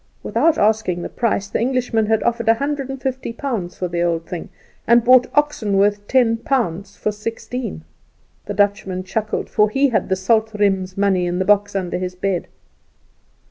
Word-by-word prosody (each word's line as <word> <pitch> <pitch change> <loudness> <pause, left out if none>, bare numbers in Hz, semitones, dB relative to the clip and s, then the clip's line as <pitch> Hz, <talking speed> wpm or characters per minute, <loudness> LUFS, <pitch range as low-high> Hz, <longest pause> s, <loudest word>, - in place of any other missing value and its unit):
Without 325 -1 +2
asking 210 -5 +1
the - - -5
price 215 -4 -1
the - - -2
Englishman 240 -3 0
had 220 0 +1
offered 235 -1 0
a 225 - +6
hundred 280 +1 -3
and 270 0 -5
fifty 260 -2 -3
pounds 230 -9 -4
for 180 - -2
the 170 0 -2
old 170 -1 0
thing, 175 0 -6 0.4
and 235 0 +5
bought 255 0 +6
oxen 285 -9 +1
worth 205 +1 +2
ten 240 -3 +3
pounds 205 -6 -2
for 215 - -1
sixteen. 225 - -5 0.6
The 205 - -4
Dutchman 200 -2 0
chuckled, 215 +3 -2
for 210 0 +2
he 270 +5 +2
had 230 - 0
the 190 - +2
Salt 220 +3 +1
riem's 190 -2 0
money 190 -3 +2
in 175 0 -2
the 185 - 0
box 205 0 +2
under 180 -2 -2
his 180 0 -4
bed. 185 -1 -2
210 Hz, 180 wpm, -20 LUFS, 190-235 Hz, 0.6 s, a